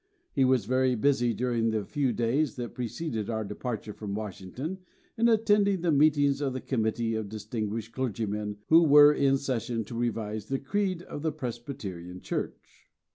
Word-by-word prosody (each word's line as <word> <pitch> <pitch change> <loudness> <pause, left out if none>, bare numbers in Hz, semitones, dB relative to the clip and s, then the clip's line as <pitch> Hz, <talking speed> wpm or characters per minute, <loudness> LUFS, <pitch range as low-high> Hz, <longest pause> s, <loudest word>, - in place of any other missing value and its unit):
He 135 - +3
was 130 -5 +3
very 130 +2 +2
busy 120 0 +2
during 115 0 0
the 110 -2 -1
few 140 -4 0
days 125 +6 0
that 120 -2 -5
preceded 120 -2 -4
our 110 -1 -1
departure 105 +1 -5
from 100 -1 -5
Washington 110 - -5 0.4
in 235 0 +3
attending 205 -4 +3
the 170 -1 +2
meetings 145 -1 +3
of 135 -3 -1
the 130 - -3
Committee 115 -2 -1
of 110 -2 -3
distinguished 110 +1 -4
clergymen 105 -4 -2
who 165 +1 +8
were 150 -2 +8
in 135 -2 +3
session 120 -4 -2
to 115 - -8
revise 110 -3 -2
the 135 - 0
creed 185 +4 -1
of 145 - -7
the 160 0 0
Presbyterian 115 - -6
Church. - - -6
125 Hz, 165 wpm, -28 LUFS, 110-145 Hz, 0.4 s, who